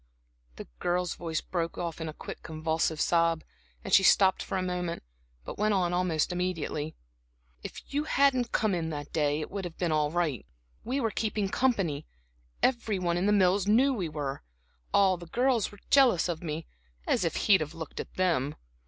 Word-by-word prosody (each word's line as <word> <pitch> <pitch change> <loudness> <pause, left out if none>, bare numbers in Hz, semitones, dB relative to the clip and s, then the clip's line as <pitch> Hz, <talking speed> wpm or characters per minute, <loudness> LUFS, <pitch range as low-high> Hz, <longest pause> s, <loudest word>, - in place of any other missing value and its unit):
The - - -8
girl's 175 -1 0
voice 165 -2 -3
broke 170 -2 -3 0.2
in 160 - -3
a - - -7
quick, - - -8
convulsive 160 0 -1
sob, 165 -1 +2 0.4
and - - -4
she - - +8
stopped 190 0 +5
for - - -3
a 185 - -1
moment, 180 - -3 0.4
but - - -7
went 210 0 +2
on 180 -2 +1
almost 175 -2 +1
immediately: 165 -4 -2 0.7
"If - - -9
you 295 +2 0
hadn't 265 -5 +2
come 215 -4 +1
in 165 -2 -1
that 145 -2 -6
day, 150 -1 +1
it - - -6
would 200 -1 -4
have 175 -2 -7
been 175 -3 0
all 150 -1 +2
right. 155 - -1 0.4
We 255 +4 -1
were 225 -4 0
keeping 210 -2 -1
company; 195 - 0 0.6
every 235 -5 +2
one 175 -2 0
in 180 +3 +1
The - - +4
Mills 195 -1 +3
knew 255 +6 +4
we 185 -9 -2
were. 145 -3 -4 0.5
All 190 -2 +4
the 175 0 -11
girls 245 +2 +1
were 205 - -13
jealous 250 -12 +5
of 170 -2 -3
me 160 -1 -4 0.4
as - - +1
if - - -1
he'd 195 -5 +4
have 155 +2 -4
looked 160 -2 -7
at - - -7
them! 160 -6 +1
180 Hz, 190 wpm, -29 LUFS, 160-205 Hz, 0.7 s, she